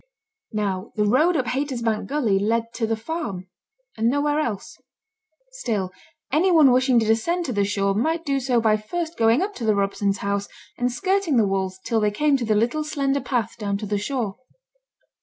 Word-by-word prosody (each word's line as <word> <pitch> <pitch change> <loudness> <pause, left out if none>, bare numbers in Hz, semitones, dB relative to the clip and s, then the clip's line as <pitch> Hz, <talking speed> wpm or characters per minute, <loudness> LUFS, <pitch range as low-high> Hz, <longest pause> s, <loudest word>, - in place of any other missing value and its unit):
Now 200 -2 -3
the 210 -2 +1
road 310 +11 +3
up 260 - 0
Haytersbank 245 -3 -1
gully 240 -9 +1
led 230 +3 0
to 230 -2 -1
the 225 - 0
farm, 220 - -5 0.5
and 225 +1 +1
nowhere 290 +3 +1
else. 225 -10 -4 0.7
Still 215 - -2 0.4
any 335 +7 +3
one 310 -6 +6
wishing 255 -1 +4
to 225 - 0
descend 335 +12 +1
to 255 - -2
the 205 -1 +1
shore 200 0 0
might 320 +10 0
do 275 -1 +1
so 250 -2 +1
by 220 -1 +3
first 330 +10 -4
going 230 +6 +3
up 410 +1 -3
to - - -6
the 215 -2 +2
Robsons' 200 0 0
house, 200 0 -2 0.3
and 245 0 0
skirting 375 0 +1
the 220 - +4
walls 190 -1 -2
till 230 -1 +1
they 210 -1 +2
came 290 +7 +2
to 245 - -3
the 215 -1 +2
little 240 +8 +1
slender 280 -2 -1
path 235 -4 -2
down 200 -2 -1
to 210 - -6
the 205 0 -1
shore. 215 -2 -3
230 Hz, 195 wpm, -23 LUFS, 210-285 Hz, 0.7 s, one